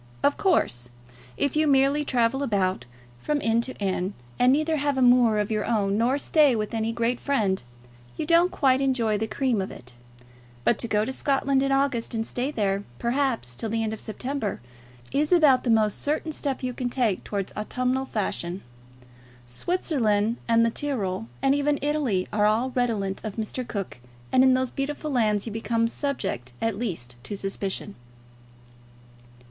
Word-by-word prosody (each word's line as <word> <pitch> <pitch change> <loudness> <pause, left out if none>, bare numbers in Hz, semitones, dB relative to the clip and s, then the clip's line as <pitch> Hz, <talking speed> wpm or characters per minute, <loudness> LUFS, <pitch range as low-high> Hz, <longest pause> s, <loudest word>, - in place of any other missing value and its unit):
Of 285 - +3
course, 125 - +1 0.5
if 285 0 0
you 310 0 +3
merely 275 +1 +3
travel 255 -1 +1
about 195 -8 0 0.3
from 300 - -1
inn 230 -2 +2
to 260 +2 -5
inn, 190 -1 -2 0.2
and 250 +1 +5
neither 310 +3 +2
have 285 -1 0
a - - +1
moor 245 -3 +5
of 210 +1 -1
your 215 -1 0
own 200 -4 +1
nor 240 +5 +2
stay 290 -3 +4
with 215 0 -3
any 225 0 0
great 235 +1 -1
friend, 210 -10 0 0.6
you - - -2
don't 340 +2 +4
quite 265 -1 +2
enjoy 235 -6 +1
the 220 - -1
cream 245 -3 0
of 190 - -4
it; 125 0 -10 0.7
but 225 - +2
to 235 - -2
go 210 -1 +1
to 265 - -3
Scotland 275 0 +1
in 275 0 +1
August 270 -4 0
and 225 0 -1
stay 250 +4 -2
there, 200 -7 -1
perhaps, 240 - -1
till 220 - -4
the 225 +1 0
end 220 0 -2
of 220 - -7
September, 245 0 -3 0.5
is 295 +3 +1
about 300 -7 +5
the 245 - -1
most 215 -2 +2
certain 310 +2 -1
step 280 -3 -3
you 250 0 -2
can 245 0 -3
take 240 -6 0
towards 200 -2 -4
autumnal 255 +5 -1
fashion. 190 -4 -3 0.8
Switzerland 225 - 0
and 230 0 +4
the 230 - +1
Tyrol, 200 - -2 0.2
and 270 - +4
even 285 +1 +1
Italy, 280 -11 0
are 210 0 +3
all 230 +5 +1
redolent 220 -6 -1
of 215 -3 -5
Mr. 235 +3 -4
Cook, 200 - -5 0.3
and 260 - +5
in 260 -1 +5
those 260 -1 0
beautiful 295 +2 -3
lands 215 -5 +2
you 230 - -5
become 230 +1 0
subject 195 - -3
at 225 -3 -1
least 125 - -4
to 200 +9 -5
suspicion. 195 +1 -4
235 Hz, 175 wpm, -25 LUFS, 210-275 Hz, 0.8 s, and